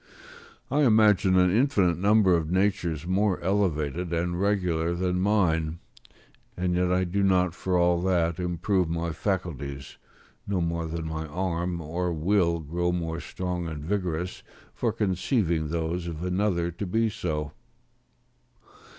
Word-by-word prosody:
I 145 Hz, +2 st, +2 dB
imagine 105 Hz, -7 st, +4 dB
an 90 Hz, -1 st, +4 dB
infinite 110 Hz, -, +2 dB
number 100 Hz, -2 st, +4 dB
of 80 Hz, -2 st, -1 dB
natures 90 Hz, -4 st, 0 dB
more 95 Hz, +1 st, +1 dB
elevated 90 Hz, -3 st, 0 dB
and 85 Hz, +1 st, -1 dB
regular 90 Hz, -5 st, +1 dB
than 90 Hz, 0 st, 0 dB
mine; 85 Hz, -6 st, +1 dB, 0.8 s
and 90 Hz, 0 st, 0 dB
yet 90 Hz, 0 st, +1 dB
I 90 Hz, +1 st, +2 dB
do 95 Hz, +3 st, -1 dB
not 90 Hz, -3 st, +3 dB
for 90 Hz, +1 st, -1 dB
all 85 Hz, 0 st, +3 dB
that 85 Hz, -3 st, +1 dB
improve 90 Hz, +1 st, 0 dB
my 85 Hz, 0 st, -2 dB
faculties, 80 Hz, -, -4 dB, 0.5 s
no 100 Hz, -2 st, 0 dB
more 85 Hz, -1 st, -1 dB
than 80 Hz, 0 st, -4 dB
my 80 Hz, 0 st, -4 dB
arm 85 Hz, +1 st, -2 dB
or 85 Hz, +3 st, -2 dB
will 85 Hz, 0 st, +1 dB
grow 85 Hz, +4 st, -1 dB
more 85 Hz, -2 st, -3 dB
strong 90 Hz, +1 st, -4 dB
and 75 Hz, -2 st, -6 dB
vigorous 90 Hz, -2 st, -2 dB, 0.3 s
for -, -, 0 dB
conceiving 95 Hz, -, 0 dB
those 85 Hz, +2 st, -2 dB
of 85 Hz, 0 st, -5 dB
another 90 Hz, -2 st, 0 dB
to 95 Hz, +4 st, -5 dB
be 115 Hz, +5 st, +1 dB
so. 75 Hz, -7 st, -3 dB
90 Hz, 140 wpm, -26 LUFS, 85-95 Hz, 0.8 s, imagine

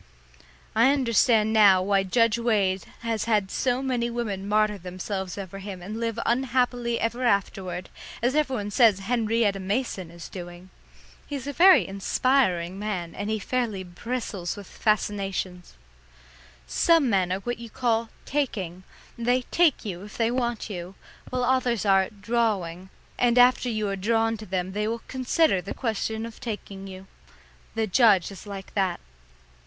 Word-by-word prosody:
I 235 Hz, +5 st, +5 dB
understand 230 Hz, -4 st, +3 dB
now 200 Hz, -4 st, +6 dB
why 195 Hz, 0 st, +2 dB
Judge 230 Hz, +4 st, +2 dB
Wade 200 Hz, -5 st, +1 dB, 0.2 s
has 225 Hz, -2 st, -1 dB
had 210 Hz, -4 st, +1 dB
so 255 Hz, 0 st, 0 dB
many 245 Hz, -3 st, 0 dB
women 205 Hz, -5 st, -3 dB
martyr 210 Hz, -1 st, +2 dB
themselves 185 Hz, +1 st, -5 dB
over 195 Hz, 0 st, -7 dB
him 195 Hz, -1 st, -7 dB
and 215 Hz, +5 st, -5 dB
live 230 Hz, -1 st, -2 dB
unhappily 245 Hz, -1 st, +1 dB
ever 235 Hz, +2 st, -1 dB
afterward, 195 Hz, -4 st, 0 dB, 0.3 s
as 245 Hz, +3 st, +1 dB
everybody 260 Hz, -9 st, 0 dB
says 210 Hz, -4 st, +4 dB
Henrietta 225 Hz, -2 st, +1 dB
Mason 195 Hz, -2 st, -2 dB
is 170 Hz, 0 st, -10 dB
doing. 175 Hz, 0 st, -9 dB, 0.6 s
He's 280 Hz, -3 st, -5 dB
a 285 Hz, -, -4 dB
very 370 Hz, +5 st, +6 dB
inspiring 195 Hz, -3 st, +1 dB
man, 190 Hz, -5 st, -3 dB
and 205 Hz, +1 st, -4 dB
he 220 Hz, -, 0 dB
fairly 215 Hz, -3 st, -2 dB
bristles 195 Hz, -1 st, -4 dB
with 205 Hz, -2 st, -9 dB
fascinations. 195 Hz, -, -2 dB, 0.9 s
Some 330 Hz, -, +3 dB
men 190 Hz, -5 st, +1 dB
are 190 Hz, +1 st, -1 dB
what 240 Hz, +2 st, -4 dB
you 235 Hz, -1 st, -8 dB
call 230 Hz, -2 st, 0 dB, 0.2 s
taking, 195 Hz, -, -2 dB, 0.3 s
and 235 Hz, 0 st, -5 dB
they 250 Hz, +1 st, +3 dB
take 335 Hz, -8 st, +3 dB
you 180 Hz, -4 st, -5 dB
if 210 Hz, -, -11 dB
they 230 Hz, 0 st, +2 dB
want 240 Hz, -2 st, -1 dB
you, 180 Hz, -2 st, -7 dB, 0.3 s
while 250 Hz, 0 st, -1 dB
others 245 Hz, -4 st, +1 dB
are 195 Hz, -1 st, +4 dB
drawing, 200 Hz, -5 st, -1 dB, 0.3 s
and 240 Hz, 0 st, +3 dB
after 250 Hz, 0 st, +5 dB
you 215 Hz, -2 st, -1 dB
are 195 Hz, -, -1 dB
drawn 225 Hz, +3 st, +1 dB
to 215 Hz, -, -10 dB
them 185 Hz, 0 st, -2 dB
they 210 Hz, +2 st, -1 dB
will 230 Hz, +1 st, -3 dB
consider 260 Hz, -, +2 dB
the 200 Hz, -, -6 dB
question 220 Hz, -1 st, -2 dB
of 230 Hz, -1 st, -10 dB
taking 200 Hz, -4 st, -6 dB
you. 190 Hz, 0 st, -10 dB, 0.7 s
The 225 Hz, 0 st, +1 dB
judge 205 Hz, -3 st, +4 dB
is 195 Hz, +1 st, -11 dB
like 195 Hz, -2 st, -8 dB
that. 190 Hz, -3 st, 0 dB
215 Hz, 155 wpm, -26 LUFS, 190-240 Hz, 0.9 s, now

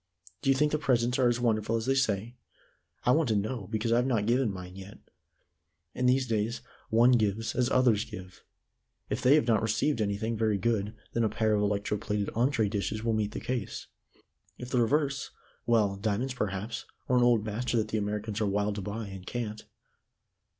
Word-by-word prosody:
Do -, -, 0 dB
you 135 Hz, -, +5 dB
think 150 Hz, +2 st, +2 dB
the 150 Hz, -, 0 dB
presents 125 Hz, -3 st, +1 dB
are 125 Hz, -, +4 dB
as 120 Hz, 0 st, 0 dB
wonderful 115 Hz, -2 st, +1 dB
as 115 Hz, -1 st, -1 dB
they 135 Hz, -, +2 dB
say? 115 Hz, -4 st, 0 dB, 0.7 s
I 125 Hz, -, +5 dB
want 155 Hz, -1 st, +3 dB
to 110 Hz, -, +2 dB
know, 105 Hz, 0 st, -2 dB
because 110 Hz, +1 st, -1 dB
I've 120 Hz, +2 st, +3 dB
not 115 Hz, -6 st, +1 dB
given 120 Hz, 0 st, +2 dB
mine 90 Hz, -1 st, -8 dB
yet. 95 Hz, +1 st, -10 dB, 1.0 s
In 125 Hz, 0 st, 0 dB
these 130 Hz, +1 st, +3 dB
days 115 Hz, 0 st, -1 dB, 0.3 s
one 120 Hz, +3 st, +5 dB
gives 110 Hz, -2 st, +1 dB
as 125 Hz, -1 st, +1 dB
others 120 Hz, -5 st, +3 dB
give. 95 Hz, -3 st, -10 dB, 0.7 s
If -, -, -1 dB
they 130 Hz, +3 st, +6 dB
have 155 Hz, -, +3 dB
not 115 Hz, -3 st, +3 dB
received 110 Hz, +4 st, 0 dB
anything 105 Hz, +2 st, -1 dB
very 110 Hz, -2 st, +1 dB
good, 105 Hz, +1 st, -1 dB, 0.2 s
then 115 Hz, -, +1 dB
a 110 Hz, -, +2 dB
pair 110 Hz, 0 st, +1 dB
of 105 Hz, -, +2 dB
electro 105 Hz, 0 st, 0 dB
plated 105 Hz, -1 st, -2 dB
entrée 120 Hz, -2 st, +1 dB
dishes 105 Hz, +1 st, -2 dB
will 115 Hz, -1 st, +1 dB
meet 105 Hz, -1 st, -1 dB
the -, -, -4 dB
case. 125 Hz, -6 st, -4 dB, 0.7 s
If 125 Hz, 0 st, -8 dB
the 125 Hz, -, +3 dB
reverse 140 Hz, +2 st, 0 dB, 0.4 s
well 105 Hz, -4 st, +3 dB
diamonds, 110 Hz, +6 st, -1 dB
perhaps, 105 Hz, -1 st, -3 dB, 0.2 s
or 125 Hz, -, +2 dB
an 125 Hz, -, +4 dB
old 120 Hz, -3 st, +3 dB
Master 115 Hz, +3 st, -1 dB
that 110 Hz, -1 st, 0 dB
the 110 Hz, -, 0 dB
Americans 105 Hz, +1 st, -3 dB
are 105 Hz, -, +2 dB
wild 100 Hz, +1 st, 0 dB
to -, -, -3 dB
buy, 105 Hz, +3 st, -4 dB
and 95 Hz, -1 st, -8 dB
can't." 110 Hz, -3 st, -4 dB
110 Hz, 200 wpm, -29 LUFS, 105-125 Hz, 1.0 s, they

